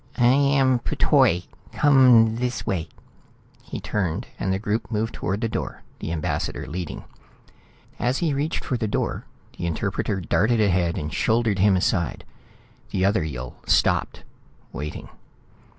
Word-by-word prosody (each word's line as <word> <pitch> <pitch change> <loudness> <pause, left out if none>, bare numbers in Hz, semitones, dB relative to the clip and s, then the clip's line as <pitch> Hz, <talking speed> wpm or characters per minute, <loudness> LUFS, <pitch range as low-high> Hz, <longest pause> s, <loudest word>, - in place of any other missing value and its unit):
"I 120 - +3
am 135 -2 +3
P'Toi. 90 -6 +2 0.3
Come 125 -6 +5
this 125 0 -2
way...." 85 -4 -2 0.7
He - - -7
turned, 90 -6 -2
and 95 - -1
the 95 - +1
group 105 +2 -2
moved 110 +1 -1
toward 100 +4 -3
the 115 - +1
door, 110 - -5 0.2
the - - -4
ambassador 80 -2 -2
leading. 85 +1 -5 1.0
As 125 +2 +1
he 165 -4 0
reached 145 +4 -2
for 125 - -1
the 110 - -1
door, 105 - -2 0.3
the 85 - -1
interpreter 100 +3 -2
darted 100 +7 +1
ahead 90 -5 +2
and 75 +1 -4
shouldered 110 -3 +1
him 100 0 +5
aside. 90 -3 0 0.7
The 95 - 0
other 100 -3 +2
Yill 65 -5 -6
stopped, - - +2 0.5
waiting. 75 +2 -6
105 Hz, 140 wpm, -24 LUFS, 85-120 Hz, 1.0 s, Come